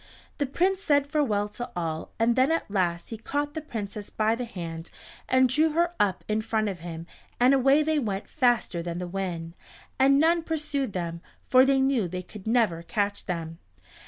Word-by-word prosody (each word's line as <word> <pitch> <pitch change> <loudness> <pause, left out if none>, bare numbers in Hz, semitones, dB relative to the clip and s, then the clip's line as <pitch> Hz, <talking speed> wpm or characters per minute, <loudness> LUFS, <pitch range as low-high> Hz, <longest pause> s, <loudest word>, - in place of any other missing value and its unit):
The 285 - +1
Prince 370 +7 +1
said 285 -5 +3
farewell 275 -9 0
to 240 +3 -6
all 160 -2 -3
and 230 +1 +2
then 260 +4 +3
at 330 - 0
the 200 - -12
last 175 -3 0
he 225 - -5
caught 290 +5 -2
the 315 - -4
Princess 210 -7 -6
by 220 +1 +1
the 245 +2 -3
hand 170 -6 -7 0.4
and 260 0 +5
drew 300 +5 +2
her 340 +2 +2
up 195 -3 +1
in 215 +1 0
front 220 -1 0
of 185 -3 -6
him, 165 0 -7 0.3
and 250 +2 +5
away 275 +3 +4
they 310 0 +1
went 205 -6 -3
faster 240 - +1
than 170 0 -4
the 180 - -3
wind, 175 -3 -4 0.5
and 275 +1 +5
none 335 +2 +4
pursed 295 - -2
them, 170 -2 -4 0.2
for 255 0 +6
they 270 0 +3
knew 265 -7 +2
they 180 +1 -5
could 200 +2 -11
never 220 -8 +2
catch 200 +5 -2
them. 165 -2 -4
225 Hz, 195 wpm, -27 LUFS, 180-275 Hz, 0.5 s, for